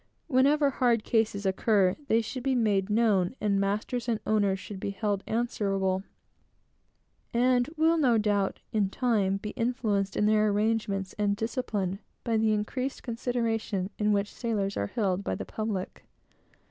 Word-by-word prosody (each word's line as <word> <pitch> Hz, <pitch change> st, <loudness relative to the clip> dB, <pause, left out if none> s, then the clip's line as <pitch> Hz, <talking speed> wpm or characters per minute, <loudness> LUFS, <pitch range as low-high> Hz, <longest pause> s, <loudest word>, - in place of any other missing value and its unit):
Whenever 285 Hz, +1 st, +3 dB
hard 240 Hz, -4 st, +2 dB
cases 220 Hz, -4 st, 0 dB
occur, 190 Hz, -1 st, +2 dB
they 225 Hz, -2 st, +3 dB
should 240 Hz, +3 st, -5 dB
be 265 Hz, +1 st, +1 dB
made 210 Hz, -4 st, +1 dB
known, 210 Hz, -3 st, +2 dB
and 200 Hz, -2 st, +1 dB
masters 215 Hz, +5 st, -1 dB
and 225 Hz, -2 st, 0 dB
owners 205 Hz, -3 st, +2 dB
should 195 Hz, 0 st, -8 dB
be -, -, -3 dB
held 200 Hz, 0 st, -2 dB
answerable, 195 Hz, -5 st, 0 dB, 1.3 s
and 245 Hz, +2 st, +3 dB
will, 325 Hz, +1 st, +3 dB
no 250 Hz, -6 st, +4 dB
doubt, 205 Hz, -2 st, 0 dB
in 205 Hz, -3 st, +2 dB
time, 205 Hz, -5 st, +1 dB
be 210 Hz, +1 st, -6 dB
influenced 220 Hz, -5 st, -1 dB
in 210 Hz, -, +2 dB
their 215 Hz, 0 st, +4 dB
arrangements 205 Hz, -2 st, 0 dB
and 205 Hz, -1 st, +2 dB
discipline 210 Hz, -4 st, -2 dB, 0.2 s
by 230 Hz, -2 st, 0 dB
the 220 Hz, 0 st, +3 dB
increased 250 Hz, +6 st, -2 dB
consideration 225 Hz, -5 st, -2 dB
in 210 Hz, 0 st, +2 dB
which 205 Hz, 0 st, 0 dB
sailors 205 Hz, -5 st, -2 dB
are 100 Hz, -, -1 dB
held 195 Hz, -, -1 dB
by -, -, -2 dB
the -, -, -5 dB
public. 215 Hz, -4 st, -4 dB
215 Hz, 150 wpm, -28 LUFS, 200-235 Hz, 1.3 s, no